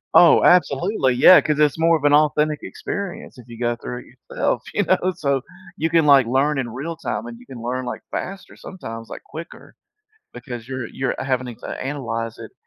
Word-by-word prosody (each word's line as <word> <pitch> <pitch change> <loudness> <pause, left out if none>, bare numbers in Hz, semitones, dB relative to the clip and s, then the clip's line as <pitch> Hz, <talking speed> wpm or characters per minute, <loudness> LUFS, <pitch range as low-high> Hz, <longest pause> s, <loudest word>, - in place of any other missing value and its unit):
Oh, 170 -3 +7
absolutely. 175 - +3
Yeah, 180 +8 +8
'cause 150 -1 -1
it's 150 +1 +2
more 165 0 +4
of 150 - -12
an 145 0 +4
authentic 150 0 +3
experience 190 -8 -6
if 120 - -14
you 115 -1 -11
go 120 -1 0
through 125 +1 -7
it - - -17 0.2
yourself, - - 0
you - - +1
know? 185 - +1
So 140 -5 0 0.3
you 165 -4 -1
can, 165 -1 +3
like, 140 -4 +6
learn 135 +4 +1
in 125 -3 -3
real 140 +8 -5
time, 165 - -4
and 235 0 -9
you 250 - -16
can 125 - -9
learn, 125 +2 -3
like, - - -5
faster 195 +1 -6
sometimes, 115 - -9
like, - - -9
quicker 165 +2 -11 0.6
because 120 -4 -8
you're 130 -1 -4
you're 135 - -3
having 130 -1 -1
it 120 - -9
to - - -8
analyze 115 -5 -4
it - - -10
140 Hz, 205 wpm, -21 LUFS, 125-165 Hz, 0.6 s, Yeah